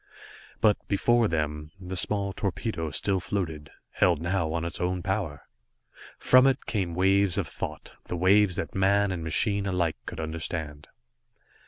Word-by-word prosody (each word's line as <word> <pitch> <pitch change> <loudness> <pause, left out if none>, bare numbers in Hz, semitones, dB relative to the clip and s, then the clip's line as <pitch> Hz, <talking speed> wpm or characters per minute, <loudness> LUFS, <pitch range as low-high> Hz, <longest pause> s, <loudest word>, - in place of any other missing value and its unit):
But 105 -2 +4
before 115 +3 +3
them, 75 -3 -2
the 95 0 -6
small 100 +1 0
torpedo 90 -4 -3
still 95 +5 0
floated, 80 -6 -4 0.2
held 85 -4 +2
now 85 -1 -1
on 85 0 -2
its 85 - -5
own 90 0 -1
power! 95 -7 -2 0.7
From 130 +1 +5
it 135 0 0
came 95 -6 -2
waves 95 0 +3
of - - 0
thought, 75 0 -7
the 90 - -4
waves 95 +1 +4
that - - -4
man 100 +1 +2
and 85 -3 -4
machine 100 +5 +1
alike 90 -4 0
could - - -6
understand. 80 -2 -4
90 Hz, 150 wpm, -27 LUFS, 80-100 Hz, 0.7 s, From